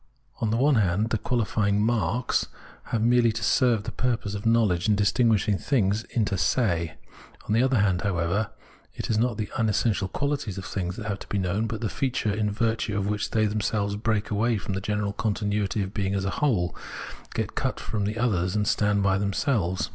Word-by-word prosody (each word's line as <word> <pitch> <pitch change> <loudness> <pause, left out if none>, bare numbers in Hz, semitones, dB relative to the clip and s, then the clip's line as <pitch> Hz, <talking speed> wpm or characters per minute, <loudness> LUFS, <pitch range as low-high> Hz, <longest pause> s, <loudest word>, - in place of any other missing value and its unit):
On 110 - 0
the 110 - +1
one 135 +1 +4
hand, 100 +4 +1
the 110 - +1
qualifying 105 -3 0
" - - +2
marks 115 +1 +1 0.2
" - - -22
have 110 -2 -1
merely 120 0 +4
to 110 0 -4
serve 115 -1 +3
the 115 - -5
purpose 115 -5 -1
of 105 +2 -3
knowledge 110 -5 +3
in 105 - +5
distinguishing 105 -1 +2
things 110 -5 +1
mter 100 -4 +1
se; 85 -11 +1 0.5
on - - 0
the 115 - +4
other 130 -1 +3
hand, 95 -4 +2
however, 100 +2 0 0.5
it - - -3
is 110 - +2
not 120 -2 +1
the 105 -2 -4
unessential 110 -3 +1
quality 140 +3 -2
of 95 - -5
things 90 -2 -3
that 115 - -7
has 100 -2 -2
to - - -10
be 100 - -2
known, 100 +4 0
but 110 +1 -4
that 110 - -1
feature 125 -6 -1
in 105 0 0
virtue 110 0 -1
of 100 - 0
which 105 0 -1
they 110 -1 +2
themselves 105 -1 -1
break 110 0 -1
away 110 +2 +2
from 95 0 -4
the 95 - -2
general 105 0 -1
continuity 105 -1 -1
of 95 +1 -6
being 100 -2 -1
as 95 -1 -1
a 100 - 0
whole, 105 -12 +1 0.6
get - - -2
cut - - -2
off - - -9
from 105 -1 -1
others 95 -6 +1
and 105 -1 +1
stand 105 -1 +2
by 95 -1 +2
themselves. 100 - 0
105 Hz, 210 wpm, -26 LUFS, 100-115 Hz, 0.6 s, in